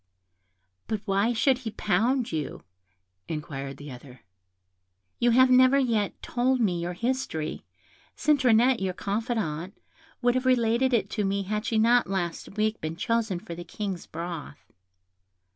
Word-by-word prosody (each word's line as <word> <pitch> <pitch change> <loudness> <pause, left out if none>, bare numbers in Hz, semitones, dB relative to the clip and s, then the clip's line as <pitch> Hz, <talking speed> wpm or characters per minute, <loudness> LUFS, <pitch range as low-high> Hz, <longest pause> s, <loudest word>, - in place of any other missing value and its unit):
"But 215 -2 -2
why 200 +3 +2
should 250 +2 +2
he 240 -4 -5
pound 225 +5 0
you?" 155 -3 -4 0.6
inquired 140 -3 -5
the 145 -1 -9
other. 125 0 -12 1.0
"You 240 - +3
have 255 +2 +5
never 255 +2 +6
yet 230 -7 0
told 255 +2 +1
me 180 -7 +1
your 175 +1 -3
history; 230 -7 -3 0.5
Citronette, 255 -4 +4
your 185 -2 -2
confidante, 200 -5 -3 0.4
would 245 -1 +2
have 255 +1 0
related 245 +1 +3
it 235 -3 +1
to 210 - -1
me 195 0 0
had 210 +3 -3
she 225 - +1
not 235 +1 +4
last 190 +1 -3
week 215 +1 0
been 155 +1 -3
chosen 220 -1 0
for 185 -2 -8
the 175 +1 -7
King's 190 0 -5
broth." 165 -3 -7
215 Hz, 145 wpm, -27 LUFS, 175-245 Hz, 1.0 s, never